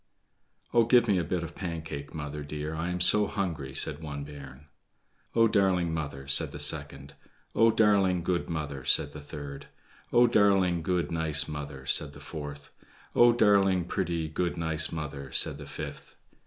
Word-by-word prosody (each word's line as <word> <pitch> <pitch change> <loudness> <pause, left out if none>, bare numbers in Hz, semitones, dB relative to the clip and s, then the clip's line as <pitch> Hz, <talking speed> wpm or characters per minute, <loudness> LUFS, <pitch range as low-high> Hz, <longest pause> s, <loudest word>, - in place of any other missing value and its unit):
"Oh, 120 - +5
give 120 0 +4
me 100 -4 +2
a - - -1
bit 85 +2 -2
of 85 0 -7
Pancake, 80 -5 -6
mother, 75 -1 -6
dear; 75 +1 -5
I 80 +2 -3
am 90 0 -3
so 105 +4 +6
hungry," 80 -10 -4
said 75 - 0
one 75 -2 -6
bairn. 70 -1 -11 0.7
"Oh, 115 0 +5
darling 95 -5 +1
mother," 70 -4 -5
said 70 - +4
the 75 - -8
second. 70 -2 -1 0.4
"Oh, 115 - +4
darling, 100 -5 +3
good 85 0 -1
mother," 75 -5 -4
said 70 - +3
the 75 - -9
third. 70 -1 -8 0.4
"Oh, 120 +1 +5
darling, 100 -6 +3
good, 90 0 -1
nice 80 -2 0
mother," 75 -3 -7
said 75 +1 +2
the 70 - -12
fourth. 75 -1 -8 0.4
"Oh, 120 0 +7
darling, 100 -5 +3
pretty, 85 -3 -2
good, 85 +3 -2
nice 80 -1 -1
mother," 70 -4 -6
said 70 - +2
the 70 - -9
fifth. - - -8
80 Hz, 170 wpm, -28 LUFS, 75-95 Hz, 0.7 s, Oh